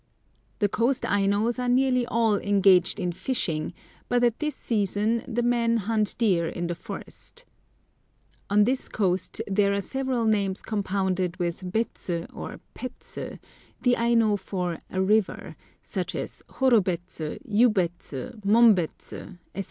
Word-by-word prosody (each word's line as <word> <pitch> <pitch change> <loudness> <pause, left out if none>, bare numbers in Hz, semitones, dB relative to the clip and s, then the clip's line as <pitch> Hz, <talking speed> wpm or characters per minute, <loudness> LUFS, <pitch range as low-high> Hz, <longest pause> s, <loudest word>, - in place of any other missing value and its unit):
The 205 - +2
coast 240 +6 +1
Ainos 205 +4 +1
are 250 0 0
nearly 250 -1 +3
all 225 -3 +2
engaged 195 -2 +4
in 180 -2 -1
fishing, 170 -6 -2 0.4
but 245 0 +2
at 240 -1 +2
this 300 -1 -2
season 215 +1 0
the 240 -1 -1
men 235 -1 +2
hunt 215 0 0
deer 185 -8 +2
in 175 - -3
the 175 - -1
forests. 475 - -10 1.0
On 205 +1 +5
this 255 +4 0
coast 185 -3 -1
there 200 0 +2
are - - 0
several 260 +2 -1
names 200 -3 +1
compounded 190 -3 -1
with 180 0 -3
bets 225 -2 -2
or 170 -1 -4
pets, 255 - -6 0.6
the 245 -1 +4
Aino 230 -3 +3
for 180 -4 -3
a 190 - -3
river, 210 +1 +1 0.3
such - - -4
as - - -5
Horobets, 190 -10 +1 0.3
Yubets, 205 -6 +2 0.3
Mombets, 205 -5 +3 0.4
etc. - - -6
210 Hz, 130 wpm, -26 LUFS, 185-235 Hz, 1.0 s, On